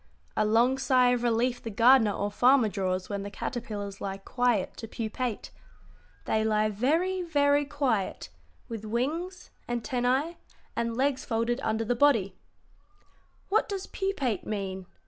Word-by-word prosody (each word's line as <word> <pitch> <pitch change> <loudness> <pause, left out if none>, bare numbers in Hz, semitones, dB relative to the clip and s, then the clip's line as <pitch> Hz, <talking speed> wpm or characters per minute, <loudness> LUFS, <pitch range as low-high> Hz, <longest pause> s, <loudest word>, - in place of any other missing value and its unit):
A - - +2
long 240 +5 +3
sigh 255 -2 +4
of 245 -1 +1
relief 240 +1 +1
the 230 - -5
gardener 230 0 +5
or 205 +1 -2
farmer 245 +1 +4
draws 185 -2 -2
when 200 -1 -3
the 200 - -5
caterpillars 205 -3 -5
lie 195 -1 -3
quiet 235 0 0
to 225 - -7
pupate. 225 +1 -4 0.7
They 220 - +1
lie 215 0 +2
very, 325 - +1
very 290 -3 +2
quiet, 270 - -1 0.4
with 225 -2 -6
wings, 310 - -3 0.2
antennæ, 250 +6 0 0.4
and 230 0 -2
legs 270 0 +1
folded 230 +2 -1
under 220 -2 -1
the 245 - +1
body." 230 -8 +3 1.1
"What 435 +3 +2
does 390 -2 -3
pupate 285 - -2
mean?" 190 -3 -4
240 Hz, 140 wpm, -28 LUFS, 215-270 Hz, 1.1 s, gardener